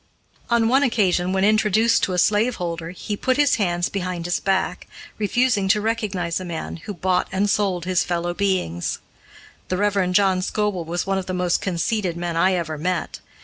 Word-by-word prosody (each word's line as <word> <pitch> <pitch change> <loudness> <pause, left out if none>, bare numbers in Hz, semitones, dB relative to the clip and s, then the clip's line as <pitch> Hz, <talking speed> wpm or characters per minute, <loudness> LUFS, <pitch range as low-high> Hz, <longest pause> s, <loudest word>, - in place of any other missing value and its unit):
On 235 -1 +3
one 265 +4 +4
occasion, 190 -8 +2
when 190 0 +1
introduced 215 +2 +3
to 185 - 0
a - - -1
slaveholder, 180 -5 0
he 185 +4 -5
put 255 +5 0
his 290 -1 +3
hands 175 -4 0
behind 180 -3 -4
his 175 - 0
back, 190 -1 -1 0.3
refusing 215 -1 +1
to 210 +2 +3
recognize 205 -6 -1
a - - -6
man 170 -2 -5
who 205 +5 -7
bought 180 0 0
and 195 +2 +1
sold 195 -4 0
his 185 -1 +2
fellow 175 0 -2
beings. 180 - -1 0.7
The 185 - -1
Rev. 200 -2 +1
John 190 -1 +3
Scoble 205 -3 -1
was 175 +2 -2
one 195 0 0
of 185 - -7
the 185 - -2
most 180 -1 +1
conceited 185 0 -1
men 170 -1 -3
I 185 +3 +3
ever 160 -4 -3
met. 180 0 -2
185 Hz, 185 wpm, -22 LUFS, 175-210 Hz, 0.7 s, one